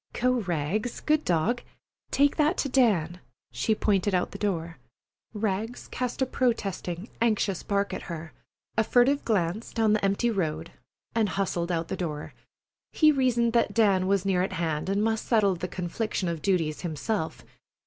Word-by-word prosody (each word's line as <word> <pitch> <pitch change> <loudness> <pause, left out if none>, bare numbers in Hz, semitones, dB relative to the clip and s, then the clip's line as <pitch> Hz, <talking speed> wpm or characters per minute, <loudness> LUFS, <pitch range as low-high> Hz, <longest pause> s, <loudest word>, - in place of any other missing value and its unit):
"Go, 250 0 +1
Rags, 185 +4 -2
good 305 0 +1
dog. 180 +8 +1 0.5
Take 285 0 +3
that 310 +3 +2
to 280 - 0
Dan." 190 -10 +2 0.3
She 125 - 0
pointed 200 -2 +1
out 180 - 0
the - - -8
door. 170 -7 -2 0.5
Rags 215 +2 -3
cast 250 +1 -2
a - - +2
protesting, 205 -7 -1
anxious 215 -5 +1
bark 200 -1 -1
at - - -4
her, 160 -2 -6 0.4
a 220 - +3
furtive 250 +5 +3
glance 200 0 -1
down 220 -2 +2
the 215 - +1
empty 200 +5 +2
road, 165 -5 -2 0.4
and 225 -3 +2
hustled 180 -3 -1
out 165 -1 -1
the - - -3
door. 155 -5 -4 0.6
He 310 -1 +5
reasoned 245 -4 +2
that 235 - +2
Dan 195 -5 +3
was 195 -1 +1
near 190 -2 +2
at 185 - -1
hand 160 0 -2
and 200 +2 +1
must 220 0 0
settle 210 -5 +3
the 180 +1 -4
confliction 185 +2 -3
of 165 -2 -3
duties 165 -4 0
himself. 165 +2 -3
200 Hz, 165 wpm, -27 LUFS, 175-230 Hz, 0.6 s, He